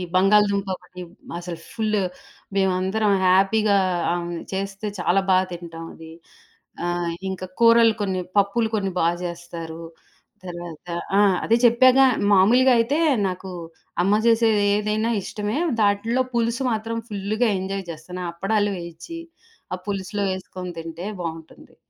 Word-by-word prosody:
బంగాళదుంపొకటి 195 -2 +2 0.4
అసలు 170 -1 -7
ఫుల్లు 215 -2 0 0.6
మేమందరం 190 +2 +1
హ్యాపీగా 200 +2 +4 0.4
ఆమె 175 -1 -3 0.2
చేస్తే 195 +2 -4
చాలా 180 +2 +2
బా 185 - +6
తింటామది. 165 -1 -9 0.7
ఆహ్, 175 -1 -1 0.2
ఇంక 190 0 -5 0.2
కూరలు 230 -1 +6
కొన్ని, 190 -2 -1 0.2
పప్పులు 220 +3 +2
కొన్ని 195 -2 -1
బా 165 - +3 0.2
జేస్తారు. 170 -1 -7 0.6
తర్వాత 175 -1 -8 0.3
ఆ! - - +6 0.2
అదే 230 +2 +4
చెప్పాగా 255 +3 +6 0.3
మామూలుగైతే 245 +7 +4 0.3
నాకు 185 0 -5 0.5
అమ్మ 200 +2 +3
జేసేది 225 -3 +4
ఏదైనా 215 +2 0
ఇష్టమే. 210 +6 -3 0.2
దాంట్లో 225 +5 +2
పులుసు 235 +3 0
మాత్రం 225 +1 -2
ఫుల్లుగా 215 +3 0
ఎంజాయ్ 195 0 -4
జేస్తాను. 180 +3 -8
అప్పడాలు 205 +3 0
వేయిచ్చి 170 - -8 0.5
ఆ - - -2
పులుసులో 200 +1 -2
ఏసుకొని 180 -1 -7
తింటే 165 +2 -7 0.2
బావుంటుంది. 165 -1 -8
195 Hz, 110 wpm, -23 LUFS, 175-220 Hz, 0.7 s, బా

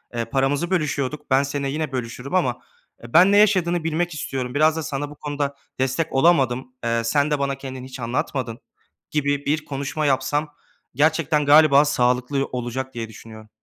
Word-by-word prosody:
eee, 115 -1 -1
paramızı 135 +7 0
bölüşüyorduk. 150 -5 -2
Ben 135 +1 +4
seninle 140 0 -3
yine 155 +1 -3
bölüşürüm 125 +4 -4
ama 125 -10 +1 0.4
ben 170 +11 +5
ne 205 - +5
yaşadığını 180 -5 +3
bilmek 165 +2 -1
istiyorum. 130 -4 -4
Biraz 155 +2 +4
da 160 - -2
sana 145 -1 -4
bu 150 - -11
konuda 145 -1 -3 0.2
destek 130 +5 -1
olamadım. 130 -4 +2
Eee, 115 0 0
sen 145 +5 +1
de 150 - +1
bana 140 0 -1
kendini 130 -1 -8
hiç 130 - -10
anlatmadın," 120 0 -3 0.5
gibi 145 -1 0
bir 155 +2 0
konuşma 140 +2 -3
yapsam 145 +2 0 0.4
gerçekten, 155 +1 +2
galiba, 145 -1 +6
sağlıklı 125 0 +1
ı - - -2
olacak 130 +2 -5
diye 115 -1 -5
düşünüyorum. 110 0 -13
140 Hz, 165 wpm, -22 LUFS, 130-155 Hz, 0.5 s, galiba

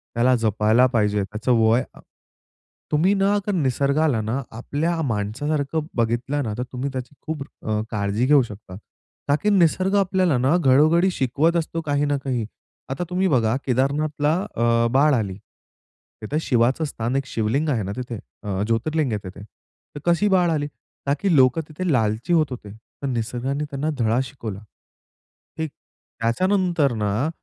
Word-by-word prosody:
त्याला 125 +2 +4
जपायला 110 +2 +3
पाहिजे 105 -3 +2
त्याचं 105 +5 -3
वय 115 +3 +4 1.1
तुम्ही 165 +6 +3
ना 200 +1 +2 0.2
निसर्गाला 140 -3 +1
ना 115 +6 -2 0.2
आपल्या 160 +7 -1
माणसासारखं 140 +6 -1
बघितलं 120 +5 0
ना, 110 -4 -3
तर 125 - -1
तुम्ही 130 +3 -2
त्याची 130 +2 -6
खूप 155 -2 -4 0.2
अ, 110 -1 0
काळजी 105 +2 0
घेऊ 145 +1 +6
शकता 105 -4 -10 0.5
का 145 - +5
की, 210 - +3
निसर्ग 190 +1 +3
आपल्याला 185 -7 +2
ना 130 +6 +2
घडोघडी 155 +4 +4
शिकवत 145 +4 +1
असतो 165 0 -2
काही 145 0 +1
ना 145 -1 +1
काही. 125 -5 -1 0.4
आता 135 +6 -2
तुम्ही 185 +1 +1
बघा 120 -7 +2
केदारनाथला 145 +4 +1 0.2
अ, 115 0 +2
बाळ 145 +4 +4
आली. 105 -7 -1 0.9
तिथं 140 +8 -2
शिवाचं 125 +2 +2
स्थान 120 -2 -3
एक 135 0 0
शिवलिंग 120 +8 0
आहे 120 -7 0
ना 95 - -4
तिथे 120 -3 -5 0.2
अ, 100 -1 -2
ज्योतिर्लिंग 135 +4 0
आहे 105 - -1
तिथे, 100 +2 -11
तर 145 +6 -16
कशी 170 +4 +3
बाळ 175 -1 +3
आली? 145 -2 0 0.4
ना 140 - +3
की 190 -5 +2
लोकं 130 +4 +4
तिथे 170 +3 -2
लालची 110 +4 +1
होत 155 -3 +4
होते. 110 -5 -7
तर 115 +5 -9
निसर्गाने 125 +3 -2
त्यांना 145 +2 -2
धडा 115 +1 +2
शिकवला. 115 -7 -7 1.0
हे 160 - -1
त्याच्यानंतर 170 - -1
ना 105 +7 0
135 Hz, 155 wpm, -23 LUFS, 115-155 Hz, 1.1 s, घेऊ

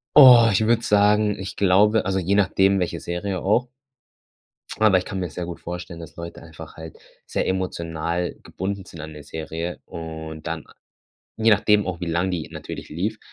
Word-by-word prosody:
Oh, 125 -5 +9
ich 100 - +3
würde 115 0 +3
sagen, 105 0 +3
ich 95 -1 -6
glaube 105 +3 +4
also 95 0 0
je 95 +3 +1
nachdem 95 0 +3
welche 90 -2 -2
Serie 90 +2 -3
auch. 120 +6 +1 1.1
Aber 110 -3 +5
ich 90 - -2
kann 95 - -4
mir 90 -2 -3
sehr 90 +3 -5
gut 85 0 -7
vorstellen, 85 0 -7
dass 80 -1 -10
Leute 85 0 -8
einfach 80 -1 -12
halt 80 -1 -10 0.3
sehr - - -2
emotional 85 -2 -2
gebunden 95 0 -5
sind 85 -5 -10
an 80 0 -8
der 75 -1 -10
Serie 80 +3 -5
und 80 -1 -7
dann - - -4 0.8
je 110 0 +4
nachdem 105 0 +4
auch 90 -3 -4
wie 90 - -3
lang 85 +3 0
die 85 -4 -4
natürlich - - -8
lief, 105 +8 -3
90 Hz, 180 wpm, -23 LUFS, 85-100 Hz, 1.1 s, Oh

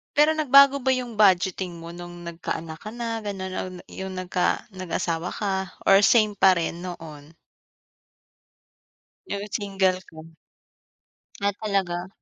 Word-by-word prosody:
Pero 300 +1 +5
nagbago 280 -2 +6
ba 265 0 +1
yung 240 -4 -5
budgeting 185 -3 +3
mo 165 - -8
nung 175 0 -9
nagkaanak 165 -1 -5
ka 215 - -8
na 230 -1 -3
gano'n, 195 -3 -5
na - - -3
na 180 -1 -10
yung 190 0 -6
nagka 180 -1 0
nag-asawa 180 -2 -3
ka 200 -2 -1 0.3
or 195 0 +6
same 215 -3 +4
pa 190 -1 +6
rin 170 0 -2
noon? 160 -4 -9 1.9
Yung 200 0 -4
single 195 -3 0
ka? - - -19 1.3
Ah, 200 0 +1
talaga. 190 -4 -1
190 Hz, 135 wpm, -25 LUFS, 175-210 Hz, 1.9 s, nagbago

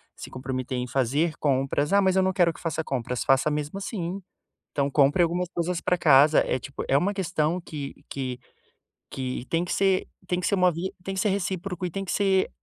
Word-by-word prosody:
se - - -9
comprometer 130 0 -4
em 125 0 -2
fazer 140 +6 +1
compras. 140 +2 +1
"Ah, 200 - +6
eu 190 - +4
não 190 - +2
quero 175 -3 +3
que - - -14
faça 160 -1 -2
compras." 125 -3 -2
Faça 135 +3 +3
mesmo 150 +5 -3
assim. 195 -2 -4 0.5
Então 140 -1 0
compre 145 +6 +4
algumas 175 +2 0
coisas 175 0 -1
pra 180 - +1
casa. 150 -2 +6
É 130 - 0
tipo, 140 - -6
é 135 - +5
uma 195 +8 +1
questão 175 -2 -1
que 145 -5 -7
que 130 -2 -4 0.8
que 130 -2 -3
tem 170 +1 +1
que - - -2
ser 195 -1 +2 0.2
tem 180 - 0
que 180 - -1
ser 200 - +2
uma 180 -1 +4
via 170 +3 -3
tem 195 - -4
que 190 - -2
ser 210 - +2
recíproco 185 -1 -2
e 175 - -3
tem 195 +2 -4
que - - -4
ser 195 -2 +2
165 Hz, 215 wpm, -26 LUFS, 140-185 Hz, 0.8 s, Ah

